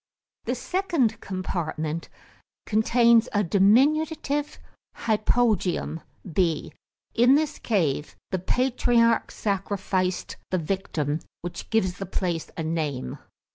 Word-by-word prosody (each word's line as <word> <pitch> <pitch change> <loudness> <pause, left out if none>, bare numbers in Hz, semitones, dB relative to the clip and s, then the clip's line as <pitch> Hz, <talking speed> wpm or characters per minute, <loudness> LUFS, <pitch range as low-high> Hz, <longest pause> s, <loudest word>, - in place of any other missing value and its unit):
The - - -1
second 335 - 0
compartment 165 -4 -3 0.6
contains 230 +2 +4
a 205 0 +2
diminutive 285 - +2 0.4
hypogaeum 215 -6 +1 0.3
(B). 165 -4 0 0.4
In 245 +4 +5
this 305 0 0
cave 155 - 0 0.2
the 185 - 0
patriarch 240 +2 +2
sacrificed 190 -2 -2
the 185 - +1
victim, 160 -4 -2 0.2
which 175 - -6
gives 185 -5 +1
the 195 - -4
place 175 -3 -2
a 165 - -2
name. 155 - -2
200 Hz, 95 wpm, -25 LUFS, 175-240 Hz, 0.6 s, In